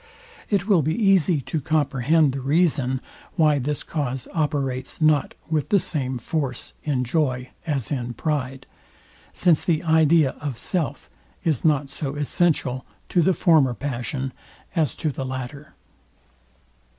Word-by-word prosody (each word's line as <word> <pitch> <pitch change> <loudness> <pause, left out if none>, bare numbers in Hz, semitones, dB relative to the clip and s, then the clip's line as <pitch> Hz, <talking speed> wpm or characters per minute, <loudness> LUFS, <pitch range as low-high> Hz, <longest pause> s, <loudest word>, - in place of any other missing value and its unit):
It 200 -2 +1
will 195 -6 +5
be 155 +3 0
easy 190 -8 +3
to 155 +4 -3
comprehend 150 0 +2
the 135 - -4
reason, 140 -3 +1 0.3
why 150 -3 +4
this 145 +2 -2
cause 135 -5 -3
operates 140 -5 -2
not 155 -3 +2
with 155 -3 -1
the 205 - +5
same 145 -8 -2
force 130 0 -3
in 135 -4 0
joy 125 -2 -1 0.2
as 135 -8 -1
in 125 -4 -3
pride; 135 -2 -2 0.7
since 170 -4 +3
the 160 -3 +1
idea 160 -3 +4
of 140 -5 -4
self 170 0 -2 0.4
is 155 -7 0
not 145 -3 +2
so 140 0 -4
essential 145 -3 0 0.3
to 175 - +3
the 185 +2 +3
former 150 -8 +4
passion 130 0 -3 0.4
as 155 -7 +1
to 155 - -1
the 135 - -5
latter. 130 +3 -6
145 Hz, 140 wpm, -23 LUFS, 130-160 Hz, 0.7 s, will